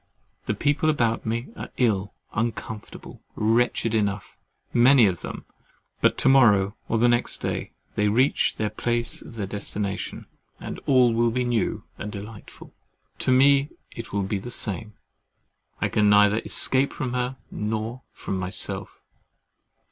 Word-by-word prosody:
The - - 0
people 145 +2 +1
about 115 -7 0
me 115 +3 -2
are - - -7
ill, 105 -5 0 0.2
uncomfortable, 110 -1 -5
wretched 115 +1 +1
enough, 100 -2 -1 0.4
many 125 0 +6
of 90 -4 0
them—but - - -4
to - - +1
morrow 105 -7 +5
or 115 - +1
next 120 0 +1
day, - - -3 0.2
they 105 - +1
reach 125 +7 +2
the 105 -1 -2
place 120 +2 -1
of - - -12
their 105 -3 -3
destination, 100 0 -4 0.3
and - - -7
all 125 -4 +5
will 115 +1 +2
be 125 +2 -1
new 120 -5 -1 0.2
and 105 - -5
delightful. 105 +1 -10 0.5
To - - +1
me 140 +2 +5 0.2
it 115 0 -8
will 100 -1 -1
be 100 +1 -2
the 120 - -8
same. 110 -1 -2 0.9
I - - +1
can 105 -1 +2
neither 105 +1 +5
escape 135 +3 +3
from 130 -4 -4
her, 125 +1 -2
nor 110 +3 -3
from 95 - -5
myself. 95 0 -3
115 Hz, 140 wpm, -24 LUFS, 105-125 Hz, 0.9 s, many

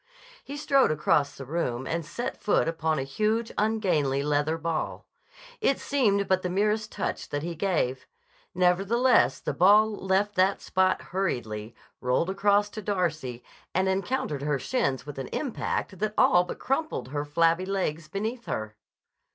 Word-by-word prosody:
He 285 - -7
strode 275 -2 +3
across 150 -1 +1
the 135 - -7
room 130 -4 -2
and 165 +3 -2
set 170 +10 -5
foot 205 - +2
upon 160 -1 0
a 135 - -1
huge, 215 +11 -1
ungainly 180 -11 +1
leather 150 +2 +1
ball. 165 0 -3 0.5
It 275 - +2
seemed 205 -8 +1
but 190 0 +2
the 180 - -2
merest 210 +3 0
touch - - -3
that 145 0 -3
he 170 +1 -3
gave. 155 -8 -1 0.5
Nevertheless 195 +8 +3
the - - -3
ball 210 +4 +5
left 195 +1 0
that 190 +1 +2
spot 185 0 +1
hurriedly, 115 - -2 0.2
rolled 125 +8 +1
across 205 +1 +3
to 215 - -6
Darcy 155 - -2 0.3
and 190 +1 +2
encountered 190 - -1
her 145 0 0
shins 135 - -1
with 145 -2 -7
an 130 - -4
impact 225 - -3
that 215 0 -1
all 180 0 +5
but - - -6
crumpled 270 - -2
her 145 +1 -2
flabby 165 +4 +2
legs 170 -5 -2
beneath 220 +8 -4
her. 110 0 -4
180 Hz, 155 wpm, -27 LUFS, 145-210 Hz, 0.5 s, ball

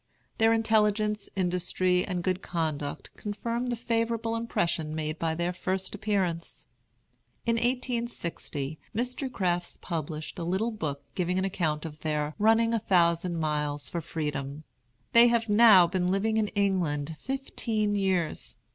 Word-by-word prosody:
Their 225 0 +5
intelligence, 215 -2 +2
industry, 180 0 +1
and 180 -3 -3
good 185 0 0
conduct 155 -4 -3
confirmed 230 +4 -3
the 245 - 0
favorable 230 -1 -1
impression 170 -9 -1
made 155 0 -3
by 160 -1 0
their 175 +2 -1
first 185 +1 -2
appearance. 195 -5 -2 0.8
In 230 0 +2
1860, 235 - -2 0.2
Mr. 250 +3 -1
Crafts 175 -6 -1
published 155 -2 -5
a - - -3
little 190 +7 0
book 155 -10 -4
giving 180 0 0
an 190 - +1
account 160 -5 -1
of 155 -1 -7
their 150 -1 -1
"Running 225 +2 +4
a 230 - +2
Thousand 170 -2 +2
Miles 150 -2 -1
for 170 - -3
Freedom." 150 -2 -4 0.5
They 235 +1 +8
have 235 -2 +1
now 205 -4 +8
been 180 +1 0
living 205 +4 +1
in 215 -1 +2
England 175 -7 0
fifteen 230 -5 -2
years. 190 -5 0
185 Hz, 140 wpm, -28 LUFS, 160-225 Hz, 0.8 s, They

